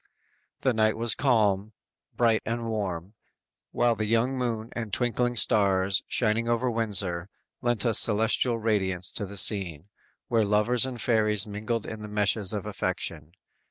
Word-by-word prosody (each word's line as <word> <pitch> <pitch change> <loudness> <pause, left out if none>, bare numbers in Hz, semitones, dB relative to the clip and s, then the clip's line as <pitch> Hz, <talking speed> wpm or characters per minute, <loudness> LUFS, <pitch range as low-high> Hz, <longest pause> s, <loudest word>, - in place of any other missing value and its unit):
The 130 - +2
night 110 -1 +1
was 115 0 +4
calm, 110 -5 +1 0.4
bright 115 -2 +3
and 115 0 -3
warm, 100 -4 -4 0.6
while 120 -1 +2
the 110 -1 -3
young 115 +4 +1
moon 115 -3 -3
and 115 -3 -5
twinkling 120 +2 0
stars, 100 -4 +2
shining 115 0 +1
over 120 +1 +1
Windsor, 100 -6 -1 0.3
lent 120 -1 +1
a 115 - +2
celestial 115 +3 +3
radiance 95 -5 -1
to 100 - -4
the 100 +1 -9
scene, 90 -3 +1 0.4
where 115 -3 +2
lovers 105 +5 +2
and 125 -2 -6
fairies 110 -4 +2
mingled 110 +2 -3
in 110 -1 -7
the 105 - -7
meshes 105 -1 +1
of 105 -2 -3
affection. 85 -6 -4
110 Hz, 150 wpm, -27 LUFS, 100-115 Hz, 0.6 s, was